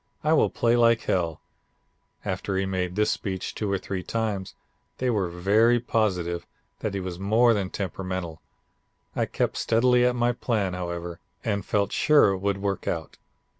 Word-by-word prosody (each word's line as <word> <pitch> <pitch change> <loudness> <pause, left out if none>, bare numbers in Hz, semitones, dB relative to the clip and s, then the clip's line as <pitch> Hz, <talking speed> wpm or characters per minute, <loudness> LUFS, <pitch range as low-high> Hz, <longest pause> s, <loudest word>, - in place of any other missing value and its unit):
I 155 +1 +3
will 155 - +4
play 120 0 +2
like 115 -1 +4
hell.' 85 -4 -1 0.8
After 95 +1 -2
he 95 - +1
had 95 - -3
made 90 -1 -2
this 105 +1 +2
speech 95 -2 -3
two 105 -2 -2
or 100 - +2
three 95 0 -4
times, 105 -3 -3 0.4
they 125 -1 0
were 100 -6 0
very 105 +7 +3
positive 90 -7 -1 0.3
that 105 -2 -3
he - - -1
was 90 -2 -5
more 115 +5 +4
than 100 -3 -1
temperamental. 95 -3 -4 0.7
I - - 0
kept - - -1
steadily 125 +2 +3
at 125 0 +3
my 120 0 +2
plan, 110 -6 -1
however, 85 -1 -5 0.2
and 100 -1 -1
felt 100 0 0
sure 150 -8 +5
it 95 - -2
would 100 0 0
work 100 -1 -3
out. 80 -2 -3
100 Hz, 170 wpm, -26 LUFS, 90-115 Hz, 0.8 s, sure